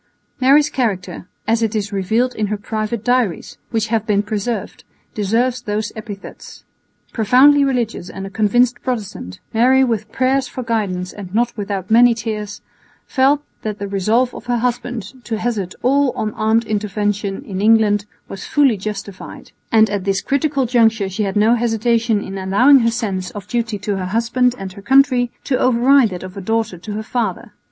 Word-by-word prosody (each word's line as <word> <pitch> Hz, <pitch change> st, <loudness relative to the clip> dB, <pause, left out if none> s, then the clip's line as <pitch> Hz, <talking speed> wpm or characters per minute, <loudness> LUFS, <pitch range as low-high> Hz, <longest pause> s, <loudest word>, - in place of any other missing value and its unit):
Mary's 285 Hz, +3 st, +4 dB
character, 185 Hz, -8 st, -2 dB, 0.2 s
as 225 Hz, +1 st, +2 dB
it 225 Hz, -1 st, 0 dB
is 205 Hz, -1 st, -2 dB
revealed 220 Hz, +6 st, 0 dB
in 215 Hz, -1 st, -2 dB
her 210 Hz, +1 st, -2 dB
private 215 Hz, +1 st, -4 dB
diaries, 245 Hz, -6 st, 0 dB
which 225 Hz, -1 st, -1 dB
have 220 Hz, -1 st, 0 dB
been 205 Hz, -1 st, +2 dB
preserved, 215 Hz, +2 st, -4 dB, 0.3 s
deserves 235 Hz, +5 st, 0 dB
those 210 Hz, -1 st, -3 dB
epithets. 215 Hz, -3 st, -10 dB, 0.5 s
Profoundly 260 Hz, +6 st, +5 dB
religious 240 Hz, -9 st, -1 dB
and 195 Hz, 0 st, -7 dB
a 195 Hz, -, -8 dB
convinced 240 Hz, +4 st, +2 dB
Protestant, 205 Hz, -, -5 dB
Mary 255 Hz, +4 st, +4 dB
with 220 Hz, -4 st, -2 dB
prayers 260 Hz, 0 st, +1 dB
for 255 Hz, -, -6 dB
guidance 200 Hz, -6 st, -2 dB
and 195 Hz, -1 st, -8 dB
not 240 Hz, +1 st, +1 dB
without 200 Hz, -2 st, -4 dB
many 235 Hz, +1 st, +6 dB
tears 210 Hz, -2 st, -5 dB, 0.4 s
felt 280 Hz, +2 st, +2 dB, 0.2 s
that 215 Hz, -1 st, -4 dB
the 200 Hz, -, -5 dB
resolve 215 Hz, +6 st, +1 dB
of -, -, -10 dB
her 245 Hz, -1 st, +1 dB
husband 245 Hz, 0 st, -3 dB
to 225 Hz, -, -2 dB
hazard 215 Hz, -5 st, -3 dB
all 275 Hz, +2 st, +3 dB
on 215 Hz, -1 st, -3 dB
armed 220 Hz, +1 st, +1 dB
intervention 205 Hz, 0 st, -2 dB
in 195 Hz, -5 st, -4 dB
England 210 Hz, -1 st, +3 dB, 0.2 s
was 195 Hz, -1 st, -8 dB
fully 275 Hz, -7 st, +2 dB
justified; 200 Hz, -1 st, -7 dB, 0.2 s
and 220 Hz, -2 st, +5 dB
at 205 Hz, -2 st, -2 dB
this 195 Hz, 0 st, -1 dB
critical 280 Hz, -1 st, 0 dB
juncture 225 Hz, -4 st, +2 dB
she 190 Hz, +3 st, -4 dB
had 195 Hz, -, -3 dB
no 215 Hz, +3 st, +4 dB
hesitation 230 Hz, -2 st, +1 dB
in 195 Hz, 0 st, -6 dB
allowing 245 Hz, +9 st, +5 dB
her 230 Hz, -1 st, +2 dB
sense 200 Hz, -6 st, -3 dB
of 200 Hz, -1 st, -8 dB
duty 230 Hz, -3 st, -2 dB
to 200 Hz, 0 st, -3 dB
her 185 Hz, -, -3 dB
husband 235 Hz, +4 st, +1 dB
and 190 Hz, -1 st, -7 dB
her 200 Hz, -, -11 dB
country 255 Hz, +1 st, +3 dB
to 260 Hz, -, 0 dB
override 255 Hz, 0 st, +4 dB
that 180 Hz, -2 st, -7 dB
of 185 Hz, +1 st, -9 dB
a 200 Hz, -, -6 dB
daughter 220 Hz, -2 st, -1 dB
to 210 Hz, +4 st, -7 dB
her 215 Hz, +1 st, -4 dB
father. 235 Hz, 0 st, -3 dB
220 Hz, 175 wpm, -18 LUFS, 205-245 Hz, 0.5 s, many